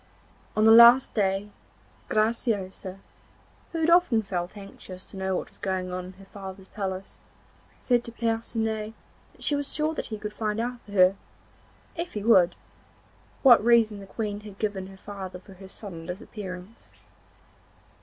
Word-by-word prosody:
On 215 - +4
the 220 - +8
last 235 +3 +8
day, 200 0 0 0.6
Graciosa, 210 -4 -1 0.7
who 330 - -3
had 325 +1 +3
often 340 -11 +4
felt 180 0 -4
anxious 190 -2 -10
to - - -11
know 190 0 -1
what - - -3
was - - -21
going 185 -2 -2
on 180 0 -4
in 185 - -10
her 195 +1 -15
father's 190 -1 -10
palace, 190 -2 -5 0.6
said 245 -2 +2
to 235 - -6
Percinet 225 -1 -2 0.4
that - - -14
she 295 - +1
was 285 -1 -2
sure 310 +1 0
that - - -4
he 220 - -5
could 210 0 -6
find 215 0 -2
out 240 +1 -3
for 205 - -14
her, 185 -1 +5 0.8
if 345 0 -4
he 210 - -4
would, 185 -6 +5 0.9
what 245 -5 +8
reason 225 -3 +4
the 195 - -10
Queen 205 -1 -3
had 210 -2 -11
given 200 -3 -2
her 195 0 -13
father 190 -2 -7
for 190 +2 -15
her 190 +1 -12
sudden 180 -4 -8
disappearance. 190 0 -8
205 Hz, 165 wpm, -27 LUFS, 190-230 Hz, 0.9 s, the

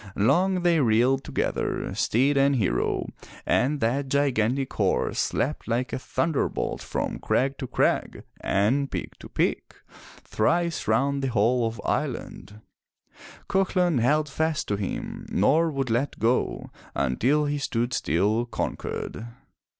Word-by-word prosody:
Long 180 - +2
they 170 -2 +4
reeled 125 +2 +3
together, - - -2
steed 135 +5 +2
and 140 0 +4
hero, 95 - 0 0.4
and 145 +3 +2
that 130 +5 0
gigantic 135 -2 +1
horse - - 0
leapt 145 +5 -2
like 120 +2 -1
a - - -1
thun 165 +5 -1
derbolt 140 - -1
from - - -3
crag 135 +1 0
to 130 - -4
crag - - 0 0.2
and 125 +8 +1
peak - - -5
to - - -11
peak - - -1 0.5
thrice 170 +9 0
round 140 0 +2
the 135 - 0
whole 120 +1 +2
of 115 -1 -6
Ireland. 105 +1 -3 0.9
Cuchulain 180 -6 +2
held 150 +6 +2
fast 160 +2 -1
to 105 - +1
him, 100 -1 -5
nor 155 - +3
would 135 -5 -2
let 120 +5 0
go, 120 +3 0 0.2
until 125 - +1
he 145 0 -1
stood 120 -2 -1
still, 105 - +1
conquered. 115 -1 -4
135 Hz, 135 wpm, -26 LUFS, 115-145 Hz, 0.9 s, they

